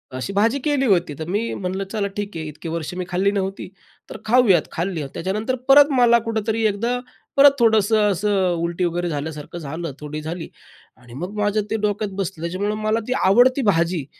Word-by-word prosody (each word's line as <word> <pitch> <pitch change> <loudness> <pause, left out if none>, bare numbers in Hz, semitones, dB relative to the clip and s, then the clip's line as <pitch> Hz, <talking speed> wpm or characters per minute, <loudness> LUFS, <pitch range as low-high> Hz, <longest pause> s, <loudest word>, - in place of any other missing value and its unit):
अशी 130 +10 -4
भाजी 225 +7 +2
केली 285 -3 +1
होती 175 -6 +2
तर 160 - -4
मी 210 +5 -1
म्हणलं 190 +1 -3
चला 210 -3 -1
ठीक 205 -3 -4
आहे 160 - -4
इतके 150 +2 -8
वर्ष 165 +1 -4
मी 180 0 -3
खाल्ली 190 +2 +1
नव्हती 195 -1 -3 0.4
तर - - -7
खाऊयात, 220 -8 +4
खाल्ली 170 -2 -3
त्याच्यानंतर 215 +8 -2
परत 290 +2 +7
मला 235 -1 +5
कुठेतरी 225 0 -1
एकदा 230 +4 -1 0.4
परत 280 0 +8
थोडंसं 220 -2 +3
असं 195 -1 +1
उलटी 170 +1 -1
वगैरे 175 0 -2
झाल्यासारखं 150 +2 -5
झालं 160 +2 -5
थोडी 150 +1 -6
झाली 165 +2 -6 0.5
आणि 125 -2 -16
मग 180 +10 -6
माझं 205 +1 +1
ते 220 - +1
डोक्यात 205 0 -3
बसलं 180 -3 -5
त्याच्यामुळं 190 +5 -2
मला 215 +1 +1
ती 250 - 0
आवडती 245 +8 +4
भाजी, 170 -4 +1
195 Hz, 180 wpm, -21 LUFS, 170-220 Hz, 0.5 s, परत